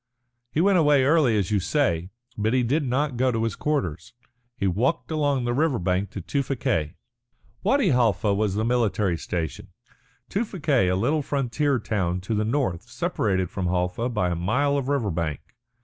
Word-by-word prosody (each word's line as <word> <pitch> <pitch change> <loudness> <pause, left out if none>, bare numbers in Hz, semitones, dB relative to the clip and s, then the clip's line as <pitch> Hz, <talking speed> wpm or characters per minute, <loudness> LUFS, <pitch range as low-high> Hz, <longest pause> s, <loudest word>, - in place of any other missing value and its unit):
"He 155 - +1
went 195 0 +4
away 145 -4 +4
early, 140 -6 +3
as 100 0 -1
you 105 - +3
say. 90 - 0 0.3
But 110 +3 0
he 125 - +3
did 145 +7 +1
not 135 +1 -1
go 130 +1 +2
to 115 -1 -1
his 115 -4 -1
quarters. 140 - -2 0.4
He - - -1
walked 120 - 0
along 145 -4 +1
the 120 - 0
river 145 0 +1
bank 90 +2 -1
to 100 - -6
Tewfikieh." 120 - -1 0.7
Wadi 275 -7 +2
Halfa 110 - +2
was 100 -1 0
the 110 +1 0
military 110 -6 +1
station, 85 -1 -4 0.6
Tewfikieh 155 - 0
a - - +1
little 140 +11 +1
frontier 140 0 0
town 95 -6 -1
to 100 +5 -3
the 105 0 +1
north 115 -4 -1
separated 110 - -1
from 95 -2 -2
Halfa 90 +6 -1
by 105 -7 0
a - - -1
mile 125 +12 +1
of 140 -2 -1
river 130 -8 0
bank. 80 -4 -2
115 Hz, 175 wpm, -25 LUFS, 95-140 Hz, 0.7 s, went